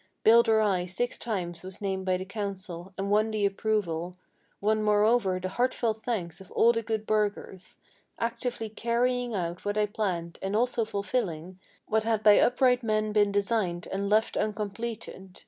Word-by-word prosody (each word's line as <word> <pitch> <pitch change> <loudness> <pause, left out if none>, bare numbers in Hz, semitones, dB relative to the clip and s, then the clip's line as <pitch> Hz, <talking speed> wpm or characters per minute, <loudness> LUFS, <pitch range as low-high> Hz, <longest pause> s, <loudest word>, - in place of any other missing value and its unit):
Builder 225 -1 +6
I 185 -4 +1
six 240 +7 -2
times 180 -7 -3
was 185 +1 -9
named 190 -2 -3
by 185 0 +2
the 185 - -6
council, 195 -3 -5
and 195 +1 -2
won 215 +1 +3
the 215 -2 0
approval, 195 -4 -1 0.4
Won 215 +1 +1
moreover 210 -2 +3
the 185 0 -3
heartfelt 240 0 0
thanks 215 -7 -4
of 190 - -13
all 235 - +5
the 230 -1 -1
good 220 -1 -3
burghers, 205 -3 -2 0.4
Actively 235 0 -2
carrying 240 +2 0
out 175 -1 -3
what 205 +1 -2
I 210 - +3
planned, 180 -5 -3
and 195 +2 -2
also 240 0 +1
fulfilling 190 -5 -3 0.3
What 220 0 +1
had 220 -1 0
by 210 -1 +7
upright 250 0 +3
men 215 -2 0
been 205 -1 +3
designed, 200 -4 0
and 200 +1 -2
left 215 +2 +2
uncompleted. 210 -2 -4
210 Hz, 165 wpm, -28 LUFS, 190-225 Hz, 0.4 s, by